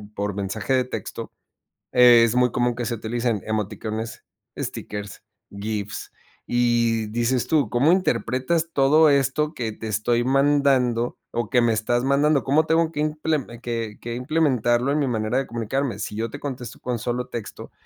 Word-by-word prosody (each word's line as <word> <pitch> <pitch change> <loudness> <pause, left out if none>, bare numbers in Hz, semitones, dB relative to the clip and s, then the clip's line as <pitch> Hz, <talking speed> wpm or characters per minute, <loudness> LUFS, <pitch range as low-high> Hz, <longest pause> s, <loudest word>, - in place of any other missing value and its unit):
por 100 0 -2
mensaje 100 +6 -2
de 130 - +3
texto, 125 - -6 0.6
es 120 -2 +6
muy 125 -1 +3
común 120 0 +1
que 120 0 -3
se 120 +1 -2
utilicen 115 -1 -2
emoticones, 110 +1 -4 0.3
stickers, 105 -1 -6 0.3
gifs, 105 0 -5 0.4
y 120 -2 +2
dices 120 +3 0
tú, 150 -8 +2
¿cómo 135 +8 +3
interpretas 165 -1 0
todo 150 +3 +5
esto 140 +2 +1
que 115 -6 -3
te 110 +1 -8
estoy 115 +3 +1
mandando 135 -3 +2
o 120 -2 -2
que 125 -2 +3
me 120 - +3
estás 120 +3 0
mandando? 140 +2 +3
¿Cómo 150 +4 +3
tengo 160 0 +2
que 150 - -6
imple 155 -1 -1 0.2
que 115 -3 -4
que 120 0 -5
implementarlo 125 -3 +1
en 150 - +1
mi 140 - +1
manera 110 0 -1
de 135 - -1
comunicarme? 120 0 -2
Si 105 - -4
yo 115 +2 -2
te - - -8
contesto 125 -4 -6
con 125 -2 -3
solo 125 +1 -2
texto, 115 -3 -7
120 Hz, 160 wpm, -23 LUFS, 115-140 Hz, 0.6 s, es